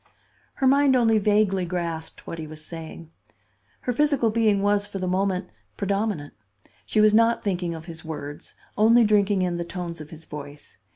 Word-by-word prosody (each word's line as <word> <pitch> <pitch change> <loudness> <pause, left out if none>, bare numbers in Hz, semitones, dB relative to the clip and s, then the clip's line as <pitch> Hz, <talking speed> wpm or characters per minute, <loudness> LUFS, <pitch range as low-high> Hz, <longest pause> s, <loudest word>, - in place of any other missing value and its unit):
Her 270 - -1
mind 275 0 +5
only 225 -3 +4
vaguely 205 -2 +2
grasped 170 -2 -4
what 165 - -6
he 155 - -5
was 155 0 -9
saying. 165 0 -9 0.7
Her 250 - -1
physical 285 -4 +2
being 215 -3 +2
was 205 0 +2
for - - -6
the 185 -1 -2
moment 185 +1 0 0.3
predominant. 200 -6 -2 0.5
She 215 - +1
was 215 0 +6
not 230 +1 +4
thinking 180 -4 -1
of 160 0 -9
his 165 -2 -9
words, 150 -2 -7 0.2
only 230 +3 +5
drinking 205 -2 +3
in 175 -1 -1
the 170 - -2
tones 170 -2 -6
of 155 - -10
his 160 0 -11
voice. 145 -1 -10
190 Hz, 175 wpm, -25 LUFS, 165-215 Hz, 0.7 s, was